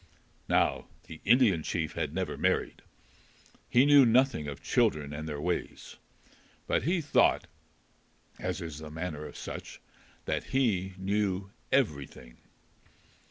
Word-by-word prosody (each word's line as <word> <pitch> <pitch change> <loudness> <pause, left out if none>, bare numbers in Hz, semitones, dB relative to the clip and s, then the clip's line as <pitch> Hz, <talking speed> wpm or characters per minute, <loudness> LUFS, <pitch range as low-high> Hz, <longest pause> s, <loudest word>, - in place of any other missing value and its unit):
Now - - +2 0.2
the 80 - -11
Indian 110 -7 +4
chief 80 0 -2
had 80 -4 -2
never 95 +3 -3
married. - - 0 0.9
He 125 +3 +5
knew 145 -1 +8
nothing 120 - +3
of 70 -1 -7
children 75 -1 +1
and 75 +2 -5
their 75 -1 -4
ways. 90 +4 -4 0.7
But - - +1
he 175 +2 +1
thought, 145 - +3 0.9
as - - -3
is 80 -3 -6
the 80 -1 -8
manner 80 -1 -5
of - - -11
such, - - -7 0.5
that - - -2
he 100 -9 0
knew 100 0 -1 0.2
everything. 70 - -1
90 Hz, 125 wpm, -29 LUFS, 75-120 Hz, 0.9 s, knew